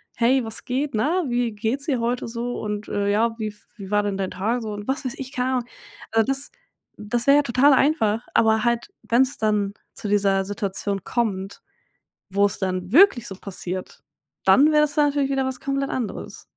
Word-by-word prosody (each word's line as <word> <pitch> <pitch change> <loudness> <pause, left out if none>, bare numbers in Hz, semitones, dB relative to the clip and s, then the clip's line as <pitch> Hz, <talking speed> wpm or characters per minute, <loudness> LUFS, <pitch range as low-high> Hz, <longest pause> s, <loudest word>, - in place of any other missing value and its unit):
hey, 250 +2 +3
was 220 0 -4
geht, 270 +3 -2
ne? 305 +12 +1
Wie 240 -1 0
geht's 225 +6 -2
dir 265 -5 0
heute 235 +1 -1
so? 235 +1 -4
Und, 210 0 -4
äh, 200 0 -1
ja, 225 +2 +1
wie 215 - -2
f 210 0 -10
wie 195 -3 -8
war 205 0 +2
denn 200 -1 -2
dein 190 -1 -2
Tag 225 +6 -1
so“ 220 -1 -5
und 205 0 -7
was 265 +1 -1
weiß 255 -2 -3
ich, 265 -1 -6
keine 255 -2 -1
Ahnung? 245 -2 -1 0.4
Also 225 +1 +2
das 270 +1 0 0.5
das 235 +3 -1
wäre 280 +1 +6
ja 290 - +4
total 270 +3 +4
einfach, 245 -6 +2
aber 220 -1 +4
halt, 235 0 0
wenn's 260 +4 +2
dann 210 -2 +1 0.2
zu 210 - -5
dieser 195 -1 +2
Situation 200 -1 -2
kommt, 200 -5 -2 0.7
wo's 200 +1 +2
dann 185 -1 -2
wirklich 290 - +6
so 195 - -5
passiert, 185 -1 -6 0.4
dann 290 +3 +6
wäre 300 -1 +5
es 295 -1 -3
natürlich 290 -2 +2
wieder 270 -1 +1
was 260 -1 -3
komplett 275 0 -2
anderes. 240 -5 -5
230 Hz, 195 wpm, -23 LUFS, 205-265 Hz, 0.7 s, wäre